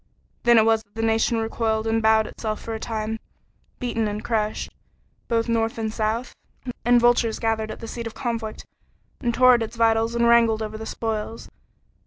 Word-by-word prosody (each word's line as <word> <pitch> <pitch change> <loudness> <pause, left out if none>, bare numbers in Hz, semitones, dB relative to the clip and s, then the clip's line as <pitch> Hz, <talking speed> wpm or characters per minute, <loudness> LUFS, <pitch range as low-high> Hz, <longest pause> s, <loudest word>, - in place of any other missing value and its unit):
Then 235 -1 +5
it 220 - +6
was 225 -1 +3
that 210 -1 -29
the 225 - -2
nation 225 +1 +2
recoiled 225 -1 -1
and 225 0 +1
bowed 220 0 +4
itself 215 0 -4
for 225 - -6
a 220 - -4
time, 220 0 -3 0.6
beaten 230 -3 -1
and 210 +1 -4
crushed 215 -2 -1 0.6
both 230 0 0
North 230 -1 0
and 220 -1 -2
South 225 +3 -2 0.5
and 240 0 +5
vultures 240 -2 +3
gathered 225 -1 -1
at - - -8
the 230 - -6
seat 235 0 -5
of 225 - -9
conflict 230 -4 -4 0.5
and 240 - 0
tore 255 +1 +6
at 240 - +2
its 225 +1 -4
vitals 225 0 +2
and 235 0 +3
wrangled 230 -2 +4
over 215 0 -5
the 220 0 -6
spoils. 225 0 -4
225 Hz, 190 wpm, -24 LUFS, 220-230 Hz, 0.6 s, it